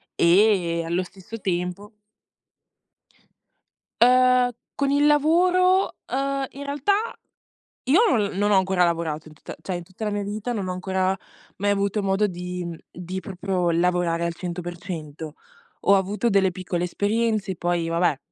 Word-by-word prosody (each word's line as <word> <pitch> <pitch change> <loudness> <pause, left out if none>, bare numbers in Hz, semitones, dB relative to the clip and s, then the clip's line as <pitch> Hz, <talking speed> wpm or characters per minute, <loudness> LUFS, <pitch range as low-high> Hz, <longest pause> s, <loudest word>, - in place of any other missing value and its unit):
E, 175 -2 +3
allo 175 +2 0
stesso 195 +5 -10
tempo 180 +3 -3 2.1
Uhm, 250 0 +5 0.3
con 280 -1 0
il 290 +1 +3
lavoro, 360 +5 +3 0.2
uhm, 275 0 -1
in 280 +1 -8
realtà 285 +7 0 0.9
io 370 - +4
l 200 -3 -1
non 205 +1 +1
ho 200 - +5
ancora 190 -1 +3
lavorato 160 -2 -2
in 155 - -15
tutta - - -10
cioè 185 - -4
in 175 - -6
tutta 190 +5 -8
la 210 - -1
mia 205 0 -2
vita 215 +4 -4
non 195 -4 -3
ho - - -1
ancora 185 +1 0 0.4
mai 205 +1 0
avuto 200 +1 0
modo 195 +2 +2
di, 180 -1 -5
mhmm, 170 -1 -6
di 180 +2 -6
proprio 185 -1 -2
lavorare 170 0 +1
al 170 0 -2
100%. 170 -3 -6 0.5
Ho 200 - +7
avuto 205 +5 0
delle 195 -1 +3
piccole 180 -1 -3
esperienze, 205 0 0
poi, 175 -1 -1
vabbè, 165 -4 +1
190 Hz, 145 wpm, -24 LUFS, 175-220 Hz, 2.1 s, Ho